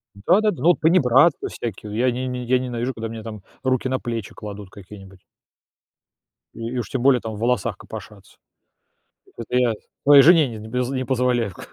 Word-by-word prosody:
Да-да, 195 - +2
ну, 165 - -6
вот 175 - +3
панибратства 150 -2 +3
всякие, 110 -2 -6
вот - - -6
я 125 +1 +2
не 130 +2 -4
не 125 -1 -4
я 125 +1 +2
ненавижу, 125 0 -3
когда 115 0 -5
мне 115 -1 -8
там 110 -3 -8 0.2
руки 130 0 0
на 130 - -1
плечи 115 -3 -5
кладут 105 -2 -9
какие-нибудь. 95 -1 -13 1.3
И 115 0 -6
и 125 - -5
уж 115 -6 -4
тем 130 - -3
более 130 -2 +4
там 110 -1 -6
в - - -9
волосах 120 -2 0
копошаться. - - -12 1.0
Это 120 +2 -4
я 120 -2 +2 0.3
своей 140 -1 +8
жене 160 -1 +6
не 115 - -8
з - - -10
не 110 - -10
поз 125 0 -1
не 130 -1 -2
позволяю 125 -3 0
в 90 - -15
к - - -11
125 Hz, 205 wpm, -22 LUFS, 110-130 Hz, 1.3 s, своей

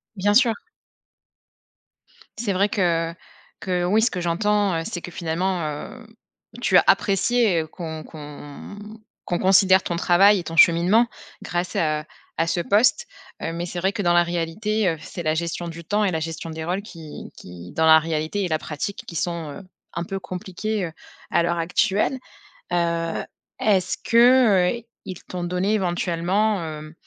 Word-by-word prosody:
Bien 205 +1 +2
sûr. 235 +1 +5 1.8
C'est 215 -3 -1
vrai 200 +3 +2
que 170 -5 0 0.5
que 180 -2 -1
oui, 210 +5 +3
ce 235 - +3
que 180 - -4
j'entends, 200 +3 +1
heu, 165 - -1
c'est 195 -6 -5
que 175 - -8
finalement, 175 +2 -1
hem, 155 - -6 0.5
tu 190 -6 +4
as - - +6
apprécié, 200 -1 +3
heu, 155 - -7
qu'on 160 -1 -7
qu'on 145 +4 -10 0.5
qu'on 175 - -1
considère 190 0 +5
ton 170 - -2
travail 195 +4 +5
et 175 - -5
ton 165 - -6
cheminement 180 +8 +5 0.4
grâce 175 0 -3
à 155 -1 0 0.3
à 165 - +1
ce 170 - 0
poste, 230 - +3 0.4
heu, 165 - -2
mais 170 +1 -3
c'est 175 0 -5
vrai 190 +3 0
que 215 - -2
dans 175 -3 +2
la 175 0 +5
réalité, 175 +5 -1
heu, 165 - -2
c'est 170 +2 -7
la 155 0 +1
gestion 170 +1 -3
du 170 0 -8
temps 205 +5 0
et 195 - +1
la 160 - -1
gestion 165 +1 -5
des 160 0 -6
rôles 180 +4 -1
qui 165 -7 -10
qui, 90 0 -11
dans 160 - +1
la 160 0 +8
réalité 160 +5 -2
et - - 0
la 160 -2 0
pratique, 155 +7 -5
qui 170 - -9
sont, 165 -2 -2
heu, 195 - -9 0.3
un 170 - -3
peu 195 +1 -4
compliquées, 190 +3 -4
heu, - - -9 0.4
à 170 - +2
l'heure 170 0 0
actuelle. 200 +8 +1 0.5
Heu, 170 -1 0 0.4
est-ce 195 -4 +1
que, 235 -5 +5
heu, - - -18 0.2
ils 185 -2 -8
t'ont 180 -1 -6
donné 180 +4 0
éventuellement, 185 +1 0
hem, 155 0 -7
175 Hz, 175 wpm, -23 LUFS, 165-200 Hz, 1.8 s, la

